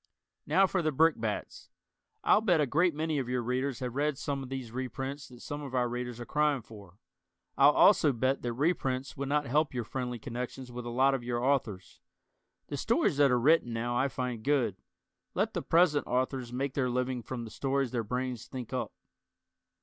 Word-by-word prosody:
Now 185 +7 +5
for 190 -1 0
the 155 -1 +1
brickbats. 135 -8 0 0.5
I'll 210 - +5
bet 180 -7 +3
a 150 - +3
great 165 +5 +2
many 155 -1 -1
of 125 -2 -3
your 125 -1 -1
Readers 130 +2 -2
have 125 -2 -3
read 145 +1 0
some 140 0 -3
of 130 - -7
these 130 -4 -5
reprints 130 +3 -5
that 125 -1 -14
some 145 0 -5
of 135 -3 -6
our 125 -1 +2
Readers 120 0 -4
are 120 - -6
crying 150 -3 +1
for. 100 -5 -14 0.6
I'll 140 +1 +7
also 155 0 +5
bet 130 +2 0
that 120 -1 -2
reprints 135 -2 -1
would 140 0 -4
not 150 0 +1
help 145 +2 +1
your 120 - -1
friendly 125 +1 -4
connections 125 +1 -6
with 120 0 -6
a - - -3
lot 130 +3 +3
of 130 -3 -2
your 120 0 -2
Authors. 115 -10 -1 0.6
The - - -5
stories - - +1
that 145 -1 +5
are 125 -1 +3
written 135 -2 +3
now 120 +1 -2
I 130 +3 +2
find 125 -3 -4
good. 130 -8 +1 0.6
Let - - 0
the - - -2
present 160 -3 +3
authors 130 0 -1
make 130 +2 -2
their 130 -3 0
living 125 0 -1
from 120 +1 -5
the 110 - -8
stories 135 -1 -1
their 120 -2 -1
brains 125 +1 -3
think 125 -3 -7
up. - - -2
130 Hz, 200 wpm, -30 LUFS, 120-145 Hz, 0.6 s, I'll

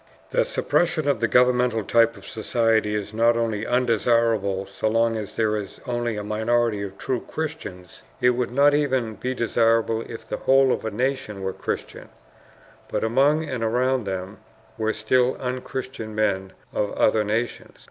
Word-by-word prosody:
The - - +2
suppression 175 - 0
of 140 -5 +2
the - - +2
governmental 125 -2 +3
type 115 +1 +3
of 100 - -13
society 110 -1 +1
is 105 0 -4
not 115 +1 +3
only 110 -2 -1
undesirable 115 -5 +1
so 100 +2 -3
long 115 +1 +2
as 105 -3 -5
there 110 -1 +1
is 105 -2 -6
only 120 -3 -2
a 105 - -4
minority 110 0 0
of 100 -1 -6
true 130 -2 -2
Christians; 120 - -6 0.2
it 125 -1 +4
would 125 0 -1
not 140 +4 +4
even 130 -6 +1
be 130 +4 -4
desirable 115 -1 +2
if 115 0 -9
the - - -3
whole 135 0 +4
of - - -1
a - - 0
nation 110 -3 -2
were 95 0 -2
Christians, - - -5 0.8
but - - -2
among 140 +7 +2
and 125 -5 -3
around 125 +1 +1
them 95 0 -5 0.4
were 110 0 0
still 125 +4 +1
unchristian 125 -3 -5
men 95 -3 0 0.2
of 105 - -1
other 110 0 +3
nations. 110 +3 -3
115 Hz, 165 wpm, -24 LUFS, 105-125 Hz, 0.8 s, it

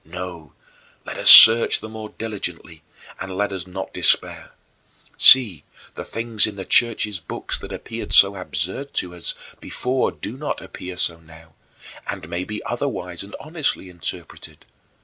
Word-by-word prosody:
No, 85 -3 -10 0.5
let - - -8
us - - +4
search 115 +1 +9
the 110 - -9
more 110 -1 -9
diligently, 90 -8 -7 0.4
and 95 -1 -7
let 105 0 -2
us 95 -2 -7
not 95 +1 -8
despair. - - 0 0.6
See, 115 - +6 0.3
the - - -8
things 115 -2 0
in 105 - -8
the 95 -1 -8
Church's 110 -4 +1
books 80 - -6
that - - -11
appeared - - -8
so 100 0 +6
absurd 95 - -5
to 90 -1 -4
us 90 - -3 0.2
before 125 +1 -3
do 125 - -9
not 145 +1 -5
appear 90 -1 -10
so 85 -2 +1
now, 80 0 -18 0.5
and - - -7
may 85 +2 -5
be 105 0 -7
otherwise - - -5
and - - -10
honestly 95 - -4
interpreted. 85 0 -9
95 Hz, 150 wpm, -20 LUFS, 85-110 Hz, 0.6 s, search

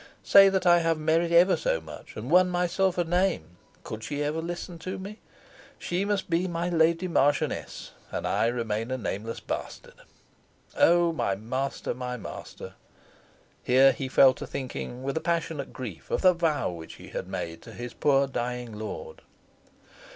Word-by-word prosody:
Say 195 0 +8
that 190 -1 0
I 175 -1 +6
have 165 -1 +1
merit 165 +2 +1
ever 175 +3 +6
so - - 0
much, - - -11
and 120 +7 -5
won 180 +1 +6
myself 180 +1 +1
a 175 - +2
name, 165 - 0 0.3
could 110 0 -7
she 145 +2 -3
ever 150 +2 -1
listen 175 +1 -6
to 185 +3 -5
me? 200 +3 -8 0.6
She 180 +3 -2
must 205 -2 -1
be 175 +2 +1
my 170 0 -2
Lady 170 +1 +2
Marchioness, 145 -4 0 0.2
and - - -3
I - - +2
remain 115 -1 -2
a 130 - -1
nameless 110 0 -4
bastard. - - -6 0.8
Oh! 170 0 +4
my 100 -10 0
master, 130 +7 -3
my 125 0 -5
master!" - - -9 0.9
(here 130 +2 +5
he 135 0 -4
fell 130 0 +6
to - - -8
thinking 130 -1 -6
with 140 +2 -2
a - - -1
passionate 165 -4 -2
grief 100 - -8
of - - -1
the 185 -1 +7
vow 165 - 0
which 80 -2 -9
he - - -12
had - - -5
made 80 0 -5
to - - -12
his 120 0 -7
poor 140 -1 +3
dying 125 -4 -4
lord.) 475 - -7
160 Hz, 170 wpm, -27 LUFS, 125-175 Hz, 0.9 s, Say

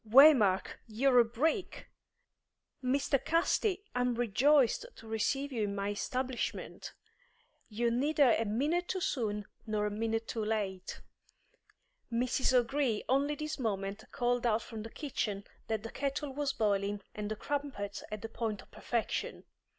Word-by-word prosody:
"Waymark, 240 -7 +6
you're 250 +3 +4
a - - +8
brick! 300 - -1 0.9
Mr. 275 +1 +1
Casti, 370 +4 +1
I'm 250 -1 +1
rejoiced 250 - +3
to 225 - -13
receive 270 +6 0
you 235 -4 -2
in 200 0 -3
my 200 0 -1
establishment! 255 +4 -3 0.8
You're 235 +2 0
neither 280 +1 +4
a 225 +1 +2
minute 295 - 0
too 375 - -1
soon 210 - -1 0.2
nor 210 -1 0
a 210 - -1
minute 225 +1 -1
too 225 - -2
late. 205 -4 -2 1.1
Mrs. 250 +3 +1
O'Gree 250 -2 +2
only 280 +3 +2
this 305 0 -4
moment 200 -2 -2
called 245 0 +1
out 225 0 +2
from 225 -2 -7
the 225 - -7
kitchen 215 -8 -3 0.2
that 220 -2 -1
the 225 - -6
kettle 275 0 -2
was 285 0 0
boiling 205 -3 0
and 210 -1 -4
the 215 - -2
crumpets 275 -7 -4
at 215 0 -5
the - - -3
point 225 -3 -3
of - - -24
perfection! 235 -2 -2
235 Hz, 145 wpm, -32 LUFS, 215-275 Hz, 1.1 s, a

